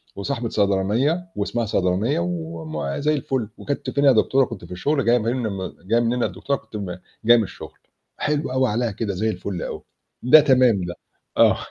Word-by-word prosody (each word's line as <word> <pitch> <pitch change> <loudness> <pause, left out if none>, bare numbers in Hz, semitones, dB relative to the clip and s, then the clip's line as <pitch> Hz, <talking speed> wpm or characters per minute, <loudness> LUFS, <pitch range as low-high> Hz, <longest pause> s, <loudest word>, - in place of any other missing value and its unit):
وصاحبة 115 +3 -3
صيدلانية، 110 - +1
واسمها 115 +3 -1
صيدلانية 95 +4 +1
وم 80 -4 -4
زي 150 +2 +1
الفل 130 -5 -2
وكنتِ 145 - -4
فين 140 - 0
يا 140 - +8
دكتورة؟ 130 +3 +3
كنت 105 -8 -9
في - - -15
الشغل 140 +10 0
جاية 120 +1 +5
منم 110 -5 -2
جاية 115 - +4
منين 120 +1 0
يا - - +2
دكتورة 105 +9 -2
كنت - - -15
م 95 -4 -4 0.3
جاية 120 +1 +7
من 110 - +2
الشغل، 95 - -10 0.4
حلو 150 -2 -1
أوي 130 -1 +2
عليها 115 +2 0
كده 100 0 -3
زي 110 +4 0
الفُل 90 -2 -4
أوي، - - -5 0.4
ده 125 +5 +8
تمام 125 -8 +4
ده. 85 -1 -5 0.4
آه. - - +5
115 Hz, 185 wpm, -22 LUFS, 95-130 Hz, 0.4 s, يا